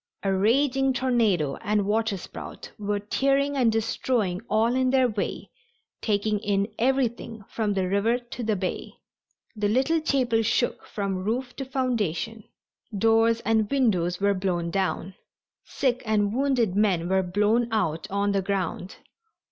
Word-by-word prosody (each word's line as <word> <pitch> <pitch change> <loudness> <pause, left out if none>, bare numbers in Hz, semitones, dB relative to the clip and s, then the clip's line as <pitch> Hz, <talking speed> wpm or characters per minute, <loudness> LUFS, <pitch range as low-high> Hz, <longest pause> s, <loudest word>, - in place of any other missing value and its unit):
A 195 -1 +1
raging 265 +6 +2
tornado 225 - +1
and 210 0 0
waterspout 210 -2 -3
were 205 0 -1
tearing 275 +7 +1
and 245 -4 +3
destroying 220 -3 -1
all 225 +2 +2
in 255 0 +2
their 260 -1 +4
way, 210 -4 -4 0.5
taking 210 0 0
in 200 -1 0
everything 235 -3 0
from 210 -3 -2
the 190 -1 0
river 200 +5 +2
to 245 0 -9
the 220 -2 0
bay. 185 -1 -4 0.6
The 210 -1 0
little 270 +8 +2
chapel 255 -7 +1
shook 230 +2 0
from 195 -3 -3
roof 245 +4 -2
to 270 - -4
foundation. 225 - -2 0.5
Doors 225 +2 +3
and 220 -1 +1
windows 185 -10 +1
were 200 0 +3
blown 180 -3 -1
down. 190 -1 -1 0.5
Sick 255 -2 -1
and 210 -2 +1
wounded 250 -7 +1
men 190 -5 +2
were 190 +1 +2
blown 210 +6 +1
out 165 -8 -1
on 200 +1 0
the 200 -1 +1
ground. 190 -1 -3
215 Hz, 140 wpm, -25 LUFS, 195-245 Hz, 0.6 s, their